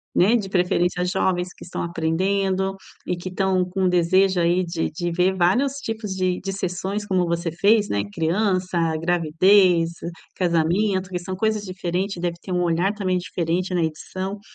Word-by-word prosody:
né? 205 +7 +5
De 200 -4 -1
preferência, 180 -1 +1
jovens 180 0 0
que - - -13
estão 175 - -5
aprendendo 190 +3 0 0.3
e 180 - -1
que 175 +2 -6
estão 185 0 +1
com 190 +1 -3
o - - +4
desejo 185 +2 +3
aí 175 +2 +2
de 170 -1 -2
de 175 +2 -3
ver 180 +2 +2
vários 220 +11 +2
tipos 225 -7 -5
de 185 -1 0
de 195 - -3
sessões, 190 +2 -3
como 185 -3 +1
você 170 0 -1
fez, 205 +5 +3
né? 100 - 0
Criança, 185 - 0 0.2
gravidez, 175 +1 +3 0.4
casamento, 180 +3 +1
que 180 - -2
são 185 +1 -5
coisas 215 +1 0
diferentes. 185 0 -3
Deve 175 -1 -2
ter 190 - -8
um 180 0 +1
olhar 175 +3 +1
também 190 -3 -1
diferente 175 +1 -2
na 175 - +2
edição. 185 +5 -4
185 Hz, 170 wpm, -23 LUFS, 175-195 Hz, 0.4 s, né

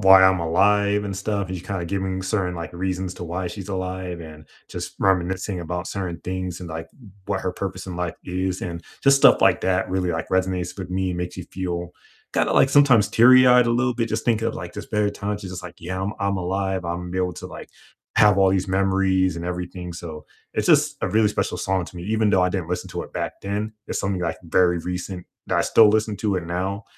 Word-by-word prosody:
why 95 -1 +8
I'm 95 0 +5
alive 100 +5 +2
and 100 -2 -4
stuff, 100 0 -2
and 95 - -3
she's 90 - -13
kind 95 -3 -3
of 85 - -5
giving 95 -1 -2
certain, 95 -2 -1
like, 85 -1 -6
reasons 95 +1 -3
to 90 - -7
why 90 +2 -3
she's 95 +2 -8
alive 95 -2 -4
and 75 -1 -11 0.2
just - - -6
reminiscing 95 0 +1
about 90 +2 -4
certain 90 -4 -4
things 90 -1 -4
and, 90 - -7
like, 80 +1 -6
w 120 -7 -16 0.2
what 100 -1 -1
her 95 - -1
purpose 95 0 -5
in 90 - -5
life 90 -2 -2
is, 95 +1 -2
and 85 -1 -5 0.2
just 140 0 +6
stuff 135 - +6
like - - +4
that 95 0 +1
really, 90 -1 0
like, 80 0 -3
resonates 95 0 -1
with 95 - -5
me 95 0 -1
and 90 - -4
makes 90 0 -4
you 90 - -6
feel 90 -2 -4 0.4
kinda - - +1
like, - - +5
sometimes, 135 -7 +5
teary-eyed 125 +1 +7
a - - +2
little 125 +1 +1
bit 115 -2 -1
just 110 +1 -2
thinking 115 -1 +1
of, - - -5
like, 85 -1 -7
just - - -8
better 105 -1 +2
times, 105 +1 -4
she's 95 -3 -7
just 90 -1 -7
like, 90 - -9
"Yeah, 95 +2 -4
I'm 100 +2 -2
I'm 100 0 0
alive. 95 0 -2
I'm 85 +1 -4
able 90 -1 0
to, - - -8
like, - - -10 0.5
have 105 -2 +6
all 95 -1 +5
these 95 0 0
memories 95 -1 +2
and 85 - -5
everything," 90 0 -5
so, 80 -3 -8 0.3
it's - - 0
just - - +4
a - - +1
really 110 0 +3
special 105 - -1
song 95 -1 0
to - - -12
me, 85 - -6
even 110 +1 +1
though 95 -2 +4
I 90 - +3
didn't 90 -4 -3
listen 90 - -3
to - - -4
it - - -12
back - - -4
then, 105 +2 -3 0.2
it's - - -2
something, 100 -2 -1
like, 85 -1 -2
very 90 +1 +3
recent 90 +1 -5 0.2
that - - +1
I - - +3
still 110 -2 +6
listen 110 0 +1
to 105 -2 0
it 90 - -3
now, 95 +4 -3
95 Hz, 240 wpm, -23 LUFS, 90-100 Hz, 0.5 s, why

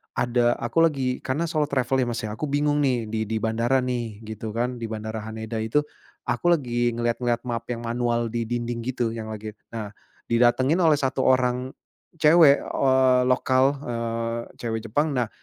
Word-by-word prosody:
ada 120 0 +2
aku 120 +8 -1
lagi 130 -5 -1
karena 145 +6 -1
solo 155 -2 0
travel 130 -1 +1
ya - - -3
Mas 120 0 -3
ya, 105 - -3
aku 150 - -3
bingung 145 +1 +1
nih 125 -4 +1
di 110 0 -1
di 110 - -2
bandara 115 +4 +1
nih 115 -4 -4
gitu 110 0 -6
kan, 120 +1 -1
di 115 - -4
bandara 110 0 -5
Haneda 110 +1 -5
itu, 115 +7 +1 0.4
aku 125 +9 +1
lagi 120 -4 -1
ngelihat-ngelihat 120 0 -1
map 115 -1 -3
yang 120 -1 -4
manual 120 0 0
di 115 -1 -2
dinding 120 0 -3
gitu 120 -2 -1
yang 110 -1 -6
lagi 110 0 -6 0.2
nah 110 -3 -5 0.4
didatengin 130 +7 +3
oleh 160 -4 +5
1 130 -1 0
orang 130 0 +2 0.5
cewek, 150 -2 +6
eee, 130 -1 +3
lokal, 130 +2 +3
eee, 115 0 -2 0.2
cewek 115 -2 -3
Jepang, 145 +8 +1
nah 125 -2 +1
120 Hz, 175 wpm, -24 LUFS, 115-130 Hz, 0.5 s, cewek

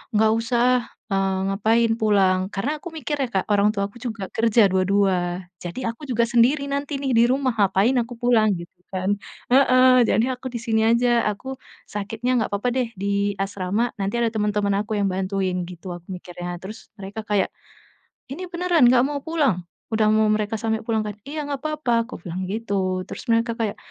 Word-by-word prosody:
"Nggak 220 +1 +4
usah, 240 +2 +2 0.3
eee, 195 -1 +1
ngapain 225 +3 +2
pulang," 195 -4 +3
karena 265 +10 -1
aku 350 - -6
mikir 295 -1 -3
ya - - -1
Kak, - - -4
orang 205 +1 +4
tua 200 0 0
aku - - -29
juga 220 -6 -4
kerja 225 -2 +4
dua-dua, 185 -2 +1 0.2
jadi 230 +7 -3
aku 300 - -16
juga 235 -1 +2
sendiri 250 +5 +3
nanti 280 0 -2
nih 270 -1 -1
di 230 - +6
rumah, 260 -1 +1
ngapain 200 +5 +3
aku 240 +1 -9
pulang, 230 -3 +3
gitu 170 - -8 0.3
kan. 185 +1 -1 0.4
Heeh, 255 -1 +6
jadi 225 - +3
aku 255 +1 -7
di 235 - -3
sini 225 -2 +1
aja, 235 0 +3
aku 260 +6 -5 0.3
sakitnya 225 +4 -3
nggak - - -4
apa-apa 205 +5 0
deh 255 -2 +1
di 200 +1 0
asrama, 195 +4 -1
nanti 200 +3 -1
ada 235 - +3
temen-temen 210 -2 0
aku 215 0 -3
yang 200 - +2
bantuin, 185 -1 -1
gitu 180 0 -8
aku 175 0 -13
mikirnya. 175 -1 -6
Terus 205 +3 -10
mereka 200 +3 -6
kayak, 205 -3 +1 0.9
"Ini 365 +6 -6
beneran 345 -5 +3
nggak 250 0 +5
mau 285 -1 -3
pulang?" 285 - +1 0.3
Udah 220 -1 +3
mau 215 0 +3
mereka 215 +1 0
sampai 220 -1 -1
pulang 220 -2 +1
kan, 210 - -3 0.2
"Iya 300 +1 -4
nggak 280 -2 -3
apa-apa," 305 -5 -1 0.2
aku - - -8
bilang 180 +2 -4
gitu, 195 -4 -1
terus - - -8
mereka 230 +1 +2
kayak, 220 -3 -2
220 Hz, 185 wpm, -23 LUFS, 195-250 Hz, 0.9 s, di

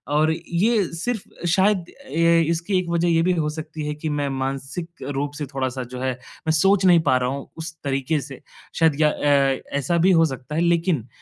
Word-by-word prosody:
और 155 +1 +3
ये 200 +7 +1
सिर्फ़ 195 -1 -5
शायद 190 +1 +3 0.2
अ, - - -13 0.4
इसकी 170 +3 0
एक 180 -2 -4
वज़ह 170 0 +1
ये 165 -1 +3
भी 180 +1 +2
हो 150 -1 0
सकती 155 -1 -6
है 150 - -2
कि 155 +1 -4
मैं 140 -1 -1
मानसिक 135 +5 -4 0.3
रूप 145 +1 -1
से 150 - -2
थोड़ा-सा 130 -1 -2
जो 125 +1 -8
है 130 0 0 0.4
मैं - - +4
सोच 195 +4 +3
नहीं 175 -2 +7
पा 130 - +5
रहा 125 0 0
हूँ 140 +1 -5
उस 160 0 -6
तरीक़े 140 +2 0
से, 135 -1 -10 0.3
शायद 160 -2 +2
या 150 - +5
अ, 140 -2 +2 0.2
ऐसा 145 +5 0
भी 180 +3 +4
हो 165 -2 +5
सकता 135 0 -5
है 165 - +1
लेकिन, 170 - +1
155 Hz, 210 wpm, -23 LUFS, 135-170 Hz, 0.4 s, नहीं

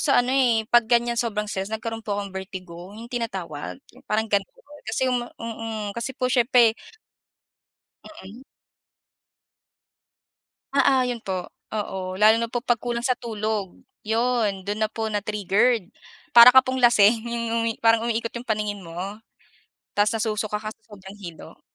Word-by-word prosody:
sa 280 - +2
ano, 255 - -1
eh, 240 -5 +3
'pag 240 -2 +5
ganyan 235 -1 +2
sobrang 215 -3 -2
stress 195 -2 -4
nagkaroon 225 +1 -4
po 210 -2 -3
akong 200 -1 -5
vertigo 185 -2 -8
yung 235 +2 -11
tinatawag, 190 -11 -4 0.2
yung 255 +2 -19
parang 215 +1 +1
ganun. 200 -1 +2 0.3
Kasi 220 +4 -1
yung 250 -1 +1
ma 240 - -8
mm. 225 -2 -5
Kasi 235 +3 -3
po 255 - 0
siyempre 245 -2 +4 1.3
Mm. 235 -3 -12 2.3
Oo, 275 -2 +4
yun 245 -2 -3
po. 185 -3 -4 0.2
Oo, 190 -3 -4
lalo 215 +3 +5
na 230 - -2
po 240 +1 -3
pag 240 -2 +2
kulang 240 -1 -3
sa 255 -1 +1
tulog. 215 -4 -3 0.3
Yun 225 -4 0
dun 205 +1 -2
na - - 0
po 220 0 -3
na-triggered. 210 +1 +1 0.4
Para 240 +1 +10
ka 260 - +10
pong 260 0 -2
lasing 225 -2 +5
yung 230 -1 -1
umi 230 - +1
parang 225 0 +4
umiikot 230 0 -2
yung 240 +1 -7
paningin 210 -2 -2
mo. 185 +6 -6 0.8
Tas 205 +1 +3
nasusuka 215 -1 -1
ka 215 - -5
sa 225 - -40
sobrang 195 0 -11
hilo. 175 -5 -11
220 Hz, 155 wpm, -24 LUFS, 205-240 Hz, 2.3 s, Para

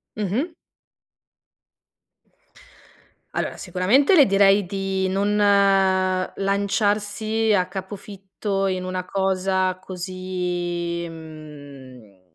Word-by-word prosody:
Mh-mh. 215 - -1 2.9
Allora, - - -3
sicuramente 245 - +3
le 295 -5 +7
direi 195 0 +4
di 195 0 -2
non 200 +2 0
lanciarsi 200 +2 +1
a 180 -3 +2
capofitto 195 +1 -4
in 185 -1 -2
una 185 0 -3
cosa 190 -1 0
così, 180 -2 -4
mhmm, 145 - -12
190 Hz, 75 wpm, -23 LUFS, 180-200 Hz, 2.9 s, le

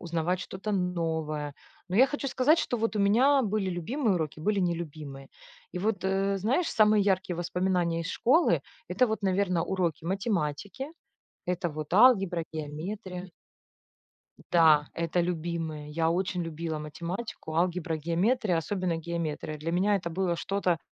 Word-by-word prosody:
узнавать 170 +2 -1
что-то 195 +4 -5
новое. 160 -5 -1 0.4
Но 180 - -4
я 260 +4 +7
хочу 290 -1 -3
сказать, 290 +7 +3
что 245 - 0
вот 225 0 -1
у - - 0
меня 255 +8 +4
были 205 -3 0
любимые 205 - 0
уроки, 155 -2 -3
были 210 +4 +1
нелюбимые. 155 -6 -3 0.4
И 180 - -5
вот, 205 0 -1
э, 195 +1 +1
знаешь, 260 - +1
самые 215 -1 +4
яркие 185 -3 +1
воспоминания 175 -1 0
из 165 - -4
школы 295 - +3 0.3
это 255 - +3
вот, 220 -2 -3
наверное, 185 -3 +1
уроки 170 -4 -1
математики, 195 - -2 0.6
это 180 0 -1
вот 155 +1 -6
алгебра, 195 -6 +5
геометрия. 180 +5 -5 1.2
Да, 155 -4 +5
это 170 +1 0
любимые. 165 -3 -3
Я 165 +1 +1
очень 180 +1 -1
любила 165 -1 -4
математику, 160 - -6
алгебра, 175 -1 0
геометрия, 180 - +1
особенно 180 +1 -1
геометрия. 165 -2 -4
Для 160 +3 -4
меня 190 +4 +2
это 175 -3 -2
было 180 0 0
что-то 180 -2 0
180 Hz, 145 wpm, -28 LUFS, 165-200 Hz, 1.2 s, я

